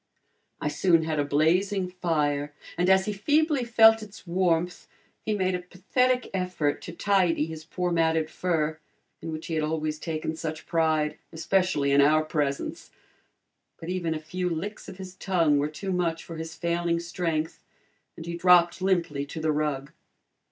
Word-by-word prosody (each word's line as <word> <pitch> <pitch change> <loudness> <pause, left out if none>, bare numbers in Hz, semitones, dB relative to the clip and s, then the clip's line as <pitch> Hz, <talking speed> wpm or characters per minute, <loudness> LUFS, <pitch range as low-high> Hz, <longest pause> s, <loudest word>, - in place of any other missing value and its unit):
I - - -2
soon 165 +1 +3
had 155 -1 -1
a - - +3
blazing 180 +7 +2
fire 150 -5 -1 0.2
and 180 +2 +1
as 190 0 +5
he 210 - -2
feebly 295 +6 +2
felt 225 -1 +6
its 210 -2 -11
warmth, 175 -1 0 0.3
he 215 - -1
made 185 -2 0
a 180 - -1
pathetic 250 +8 0
effort 180 -6 -1
to - - -7
tidy 180 -3 +2
his 160 -1 -8
poor 180 +1 -2
matted 160 -1 +2
fur, 160 -2 -1 0.4
in 165 - -5
which 155 0 -6
he 165 - -4
had 155 - +1
always 155 0 -2
taken 160 -1 -3
such 160 0 -5
pride, 160 -2 +1
especially 165 -4 +1
in 140 0 +6
our 155 +2 +4
presence. 145 -3 -2 0.9
But 165 - -7
even 175 -3 -1
a - - -3
few 180 +4 -3
licks 185 +6 -5
of - - -10
his 185 -1 -8
tongue 170 -6 +2
were 145 +1 0
too 190 +5 -5
much 170 -2 -1
for 165 - -8
his 160 0 -6
failing 170 +1 0
strength, 170 -2 -3 0.5
and 165 - -8
he 170 - -4
dropped 175 0 +4
limply 170 -7 0
to 160 - -6
the 155 0 +1
rug. 145 -2 -2
170 Hz, 170 wpm, -27 LUFS, 155-185 Hz, 0.9 s, felt